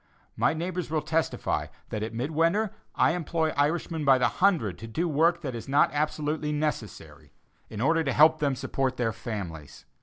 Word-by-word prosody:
My - - +2
neighbors 175 +1 -3
will 155 -2 -1
testify 160 +1 -1 0.2
that 110 - -3
at 110 - -3
mid 125 +7 -3
winter 170 +7 +2 0.2
I - - +4
employ 165 -1 -1
Irishmen 160 +2 0
by 135 -2 +6
the 125 - +3
hundred 170 - +1
to 115 - -8
do 165 +10 -1
work 165 +3 +2
that 135 -6 -4
is 120 +3 -7
not 140 +2 +4
absolutely 150 0 -1
necessary, 95 - -4 0.4
in 110 -1 -6
order 165 +5 +3
to 135 - +1
help 155 +1 +6
them 140 -3 +1
support 130 0 -2
their 115 -2 0
families. 95 -10 -7
150 Hz, 180 wpm, -27 LUFS, 120-160 Hz, 0.4 s, by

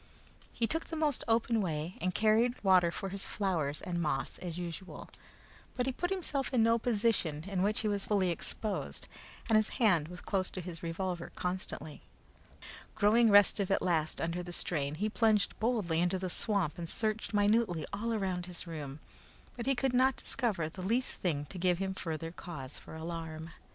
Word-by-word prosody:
He 230 - 0
took 325 +7 -1
the 325 - -6
most 305 -4 +1
open 225 0 +2
way, 165 -1 -2
and 185 +1 -1
carried 225 +3 +3
water 185 -3 +5
for 195 +3 -4
his 195 +1 -4
flowers 165 -8 -1
and 175 -1 -2
moss 145 -4 -1
as 175 -2 -5
usual; 175 +1 -6 0.7
but 250 - 0
he 265 - +1
put 355 +7 -2
himself 320 -8 -1
into 245 -4 +4
no 230 +1 +4
position 210 -10 +1
in 190 0 -2
which 210 +3 +2
he 220 - 0
was 205 -1 0
fully 195 -4 +2
exposed, 205 +5 -3 0.4
and 225 -2 +5
his 215 0 +2
hand 180 - +4
was 180 +1 -9
close 190 -2 -1
his 180 -2 -6
revolver 175 +1 -3
constantly. 180 -4 -4 0.9
Growing 225 +2 +5
restive 200 -1 +6
at 195 - +2
last 160 -3 +1
under 170 +2 -1
the 175 0 -7
strain, 150 -4 -1
he 205 +7 0
plunged 215 -1 +2
boldly 215 -8 +1
into 180 +2 +2
the 185 -1 -3
swamp 195 -8 0
and 170 -1 -3
searched 220 +2 -1
minutely 205 -6 +2
all 230 +3 -1
around 185 -5 -1
his 180 -1 -6
room, 150 -4 -6 0.6
but 240 +1 -5
he 270 - +3
could 260 +1 0
not 260 +1 +4
discover 200 -10 -1
the 180 +4 -8
least 235 +7 0
thing 150 -5 -1
to 180 +5 -8
give 180 0 +3
him 190 +1 -2
further 165 -2 -4
cause 145 -6 -7
for - - -11
alarm. 160 0 -5
190 Hz, 180 wpm, -32 LUFS, 170-220 Hz, 0.9 s, restive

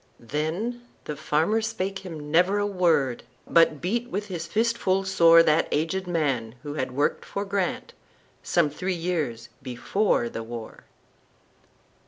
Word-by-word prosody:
Then 165 - -3 0.2
the 150 - -5
farmer 155 +9 +1
spake 195 -4 -3
him 155 -5 -8
never 180 +5 +4
a 205 - +1
word, 170 -10 +1 0.2
But 165 -3 +4
beat 235 +7 -1
with 205 +2 -4
his 170 -2 -4
fist 230 +6 +1
full 190 -3 +1
soreThat 165 -4 +5
aged 165 +5 -1
man, 135 -9 -1
who 145 -1 -5
had 130 -4 -3
worked 145 +3 0
for 200 +1 -4
GrantSome 180 -4 -2
three 180 +5 -2
years 155 -10 -2
before 130 - 0
the 115 - -5
war. 115 0 -8
170 Hz, 135 wpm, -25 LUFS, 145-195 Hz, 0.2 s, soreThat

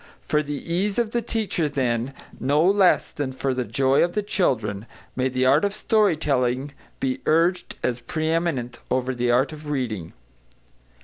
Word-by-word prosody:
For 150 - +1
the 145 0 -4 0.2
ease 195 +3 0
of 235 -2 +1
the 235 - 0
teacher, 210 -8 -1
then, 130 -2 -1 0.2
no 145 +4 +2
less 195 -1 +4
than 145 -3 -3
for 130 0 -1
the 130 0 -1
joy 130 +5 +2
of 175 0 0
the 210 - -1
children, 110 - -1 0.3
may 130 +1 +1
the 130 0 0
art 135 +6 +4
of 200 0 0
story 210 -5 +2
telling 130 -2 0 0.3
be 130 -1 -1
urged 170 +3 +2
as 125 -1 0
pre 155 +6 -3
eminent 160 -8 -1
over 130 0 0
the 120 -1 -1
art 130 +5 +2
of 150 -1 -9
reading. 110 - -3
140 Hz, 175 wpm, -24 LUFS, 125-170 Hz, 0.3 s, less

